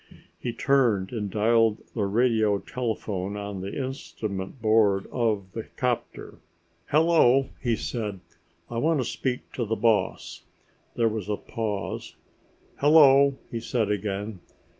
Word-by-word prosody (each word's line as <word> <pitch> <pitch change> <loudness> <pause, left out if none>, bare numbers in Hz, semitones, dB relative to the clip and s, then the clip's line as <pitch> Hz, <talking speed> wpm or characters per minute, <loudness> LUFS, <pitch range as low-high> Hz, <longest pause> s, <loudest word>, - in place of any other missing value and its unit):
He 120 - -3
turned 115 -8 +2
and 105 -4 -3
dialed 110 +1 +2
the 105 -4 0
radio 110 -1 +2
telephone 105 -4 -3
on 100 -2 -5
the 95 +1 -5
instrument 110 -5 -6
board 110 -3 +3
of 105 -6 -1
the 115 - -3
'copter. 125 -2 -4 0.5
"Hello," 150 -4 +4
he 120 -3 +1
said, 105 -4 -4 0.5
"I 115 - -3
want 160 +2 +2
to 130 - 0
speak 125 +1 -3
to 125 - -3
the 115 0 -1
boss." 110 -3 0 0.5
There 115 - +2
was 110 -3 -3
a 105 - 0
pause. 110 -4 -4 0.6
"Hello," 140 -2 +6 0.2
he 115 - -3
said 115 -2 -1
again. 100 0 -3
110 Hz, 130 wpm, -26 LUFS, 105-125 Hz, 0.6 s, Hello